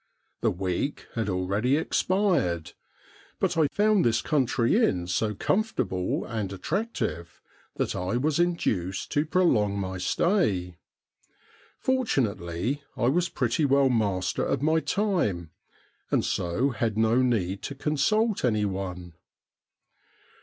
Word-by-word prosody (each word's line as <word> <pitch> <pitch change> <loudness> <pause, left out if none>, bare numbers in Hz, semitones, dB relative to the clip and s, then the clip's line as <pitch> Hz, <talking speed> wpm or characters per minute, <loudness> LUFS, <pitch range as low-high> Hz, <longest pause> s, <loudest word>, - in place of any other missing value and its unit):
The - - +2
week 90 +9 -2
had 115 -3 -2
already 100 +9 +1
expired, 160 - 0 0.7
but - - +1
I 160 -2 +3
found 210 +3 +2
this 120 0 +2
country 135 -2 +1
inn 90 - +1
so 105 +4 -1
comfortable 115 - -1
and 110 -5 -3
attractive 95 - -3 0.4
that - - -1
I 90 +6 -1
was 150 +4 0
induced 105 - -1
to 145 +2 +1
prolong 115 - +2
my 95 -1 -3
stay 95 - 0 1.0
Fortunately, 130 - -1 0.2
I 120 - +2
was 175 +4 +1
pretty 165 - 0
well 140 -1 +4
master 100 -6 0
of - - -1
my 160 +1 +3
time, 160 - -1 0.6
and - - +1
so 105 +11 0
had 110 -2 -2
no 110 +3 +3
need 100 -7 0
to 140 - -5
consult 190 - +1
any 105 -4 +2
one. 90 -3 -5
115 Hz, 120 wpm, -27 LUFS, -, 1.0 s, well